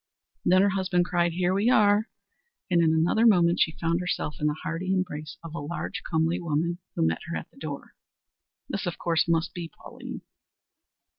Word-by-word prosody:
Then 185 +1 +5
her 200 - +4
husband 185 -2 +1
cried, 175 -1 +1
"Here 180 +1 +1
we 205 +5 +2
are!" 210 -2 +4 0.6
and 170 -1 +4
in 160 -1 +4
another 170 +9 +3
moment 175 -5 +4
she 160 - +2
found 165 0 +1
herself 180 -4 -2
in 150 - +1
the 150 - 0
hearty 180 +2 -2
embrace 170 -5 -2
of 165 -2 -8
a 170 - -4
large, 145 +4 -4
comely 165 +1 +1
woman 170 +2 -1 0.2
who - - +2
met 80 0 0
her - - -3
at - - -8
the - - -24
door. - - -7 0.7
This - - -3
of - - -3
course 165 -1 +1
must 165 0 +1
be 170 -2 -5
Pauline. - - -9
170 Hz, 190 wpm, -27 LUFS, 160-185 Hz, 0.7 s, Then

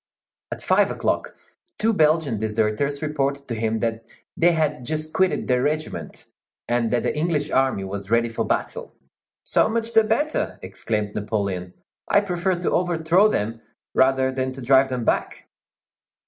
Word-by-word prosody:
At - - -6
five - - +3
o'clock, - - -2 0.4
two 225 +1 +2
Belgian 155 - +2
deserters 110 +7 -1
reported 140 -2 -1
to 120 - -3
him 110 0 -1
that 115 -1 -2 0.3
they 175 +1 +4
had 150 -4 0
just 155 +4 -3
quitted 190 -1 +1
their 125 -1 +2
regiment, 155 +3 -3 0.4
and 120 -1 +1
that 120 0 0
the - - -1
English 150 -1 -1
army 130 -7 +1
was 100 +1 -5
ready 115 +1 +3
for 115 - -2
battle. - - -3 0.5
"So - - +2
much 230 0 -2
the 225 - +6
better!" 265 +8 -1
exclaimed 105 +2 -3
Napoleon. 100 -4 -3 0.3
"I 200 - +4
prefer 185 -1 -1
to - - +1
overthrow 175 +2 +3
them 115 - -2 0.3
rather 130 0 +3
than 130 0 -2
to 135 - -9
drive 135 +2 +4
them 125 -3 -3
back." - - -1
135 Hz, 155 wpm, -23 LUFS, 115-160 Hz, 0.5 s, the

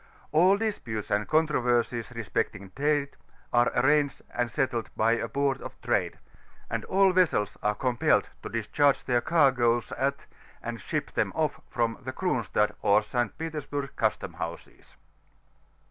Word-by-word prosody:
All 180 +6 +5
disputes 125 - -3
and 105 0 +1
controTersies 125 -6 +1
respecting 105 -3 -3
trMe, 145 +2 +1 0.4
are 120 0 +4
arranged 145 +2 +2
and 120 0 -1
settled 125 -5 -1
bjT 115 +1 +2
a - - -4
Board 140 -1 0
of - - -9
Trade; - - 0 0.5
and - - -1
all 195 0 +4
vesseb 155 - +2
are 105 0 +1
compiled 125 -1 +2
to - - -6
discharge 135 +5 +1
their 120 -2 +2
caigoes 125 -7 +3
at, 140 +1 -1 0.4
and - - -5
ship - - -3
them - - 0
off - - -1
from, 115 -1 -1
the 130 0 -5
Cronstadt 115 - 0
or 105 +1 +4
St. 120 +1 -2
Petersburg 150 -3 -4
custom 110 -5 -1
houses. 85 0 -8
125 Hz, 140 wpm, -28 LUFS, 115-145 Hz, 0.5 s, All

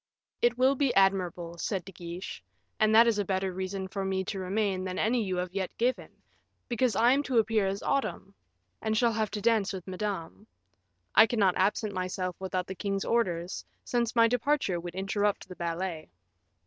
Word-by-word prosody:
"It 240 0 +3
will 260 +2 +4
be 275 -1 +1
admirable," 180 -3 +1
said 190 -2 -2
De 195 - -9
Guiche; 175 - -7 0.4
"and 215 0 +4
that 230 +1 +8
is 230 -3 +2
a - - +2
better 190 -1 -1
reason 190 +1 -4
for 195 +1 -4
me 190 0 -1
to 195 0 -4
remain 190 0 -1
than 185 0 -4
any 235 +1 +2
you 190 -2 -2
have 180 0 -3
yet 190 -2 -3
given, 250 +2 0 0.6
because 240 -2 +1
I 235 +4 +5
am 275 +2 +3
to 265 -4 -1
appear 220 -2 +3
as 195 +1 -3
Autumn, 275 0 -1 0.5
and 220 0 0
shall 235 0 +3
have 220 -1 0
to 210 - -4
dance 215 -3 +2
with 185 -3 -6
Madame. 185 - -4 0.7
I 220 - +8
cannot 205 -5 +2
absent 205 +2 +1
myself 185 -1 -3
without 185 -1 -2
the 190 - -6
king's 195 +1 -2
orders, 180 -6 0 0.2
since 240 -1 -1
my 230 -1 +6
departure 245 -6 +1
would 175 0 -7
interrupt 200 +2 -1
the 185 - -9
ballet." 170 -1 -3
195 Hz, 185 wpm, -29 LUFS, 185-225 Hz, 0.7 s, that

